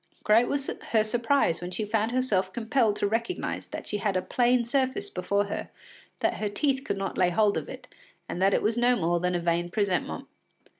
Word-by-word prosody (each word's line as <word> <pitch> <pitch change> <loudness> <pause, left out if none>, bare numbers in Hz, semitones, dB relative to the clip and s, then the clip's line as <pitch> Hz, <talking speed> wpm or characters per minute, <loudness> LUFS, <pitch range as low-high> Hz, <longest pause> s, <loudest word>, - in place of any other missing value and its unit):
Great 225 +3 +4
was 280 -1 -1
her 220 -5 0
surprise 235 -4 +1
when 175 - -4
she 185 +4 -3
found 220 +1 0
herself 210 -7 +1
compelled 230 0 +1
to - - -1
recognise 230 - -2
that - - -7
she 210 - -3
had 200 -2 0
a - - 0
plane 245 -1 +2
surface 260 -4 -1
before 200 +3 0
her, 200 - -5 0.5
that - - +1
her 210 - -2
teeth 270 +5 0
could 200 - -2
not 195 0 -3
lay 180 -1 +4
hold 205 +3 +2
of - - -4
it, - - -9 0.4
and 180 - -4
that 195 +1 +4
it - - 0
was 220 +2 +1
no 245 +1 +4
more 175 -4 +1
than 180 +1 0
a - - +1
vain 170 0 0
presentment. 185 - -1
210 Hz, 210 wpm, -27 LUFS, 185-240 Hz, 0.5 s, Great